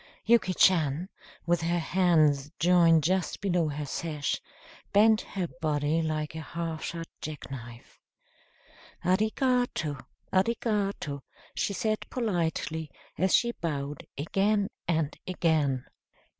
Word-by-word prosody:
Yuki 220 -5 +3
Chan, 165 -1 +3 0.4
with 175 -1 +2
her 170 +1 +1
hands 160 -5 +3
joined 165 -1 +5
just 185 +3 0
below 180 -5 +1
her 145 0 -4
sash, 150 0 -2 0.5
bent 215 +1 +5
her 185 -3 -4
body 150 +1 +1
like 155 -1 -2
a 160 - -5
half 165 0 -4
shut 165 -1 -4
jack 150 -2 -7
knife. 120 -2 -10 1.0
"Arigato 215 - +1 0.3
arigato," 195 - 0 0.3
she 200 - -1
said 215 +2 0
politely, 165 - -1 0.3
as 185 +3 +3
she 235 -1 +3
bowed 145 -3 -3
again 200 +7 +1 0.2
and 160 -3 0
again. 155 -8 +1
165 Hz, 110 wpm, -28 LUFS, 150-190 Hz, 1.0 s, joined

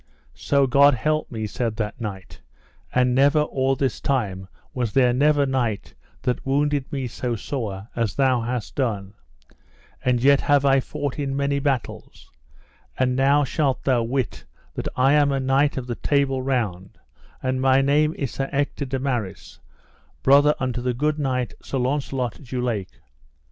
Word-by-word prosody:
So 140 -1 +1
God 140 +2 +5
me - - -9
help, 155 +4 0 0.2
said 110 +1 -2
that 105 +1 -4
knight, 95 -8 -7 0.5
and 125 0 +2
never 140 +4 +4
or 135 -2 0
this 130 -3 -1
time 100 -9 -1 0.3
was 120 -5 -2
there 125 -2 +4
never 145 +2 +3
knight 125 -6 -2 0.3
that 125 -1 -1
wounded 145 0 0
me 135 -2 -2
so 120 0 -3
sore 105 -4 -5
as 115 -4 -1
thou 130 -3 +2
hast 120 -2 -4
done, 105 -7 -2 0.9
and 125 -1 +2
yet 140 +3 +4
have 145 -1 +3
I 135 -1 +5
fought 145 +1 -4
in 135 -1 -2
many 140 0 0
battles; 135 -3 -4 0.7
and 125 -1 +1
now 140 +2 +3
shalt 140 0 -1
thou 130 -3 +2
wit 125 -1 -2 0.3
that - - -4
I 135 +2 +4
am 145 -1 +4
a 135 - 0
knight 135 +2 +2
of 130 - -3
the 120 - -3
Table 135 +1 0
Round, 110 -9 -2 0.5
and 130 0 -1
my 130 0 +4
name 150 +3 +2
is 135 -4 -3
Sir 135 0 -3
Ector 140 0 -1
de 135 0 -2
Maris, 120 -8 -4 0.6
brother 145 +2 +5
unto 130 -1 -2
the 125 -1 -1
good 150 +4 0
knight, 125 -7 -1
Sir 135 - -4
Launcelot 130 -1 -2
du 125 0 -5
Lake. 115 -6 -3
130 Hz, 165 wpm, -23 LUFS, 120-140 Hz, 0.9 s, God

